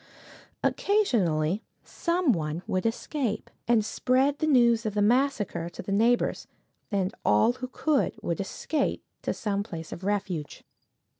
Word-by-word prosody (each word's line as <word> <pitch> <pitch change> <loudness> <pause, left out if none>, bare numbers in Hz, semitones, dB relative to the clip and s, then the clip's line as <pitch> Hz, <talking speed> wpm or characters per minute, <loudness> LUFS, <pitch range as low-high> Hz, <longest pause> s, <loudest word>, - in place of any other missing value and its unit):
Occasionally 200 - +2 0.2
some 340 -3 +1
one 160 -2 -2
would 185 +4 0
escape, 235 0 -2 0.2
and 230 -3 +3
spread 265 +5 +1
the 310 - +1
news 235 -5 +4
of 215 -2 -3
the 205 - +2
massacre 230 -7 +1
to - - -9
the 195 - -5
neighbors, 230 +4 +2 0.4
and 195 -2 0
all 105 - +4
who 255 0 -6
could 290 +2 0
would 170 -3 -2
escape 275 +9 -2 0.2
to - - -1
some 200 -2 -1
place 165 -6 -7
of 180 - -7
refuge. 190 -6 -2
215 Hz, 140 wpm, -27 LUFS, 185-255 Hz, 0.4 s, news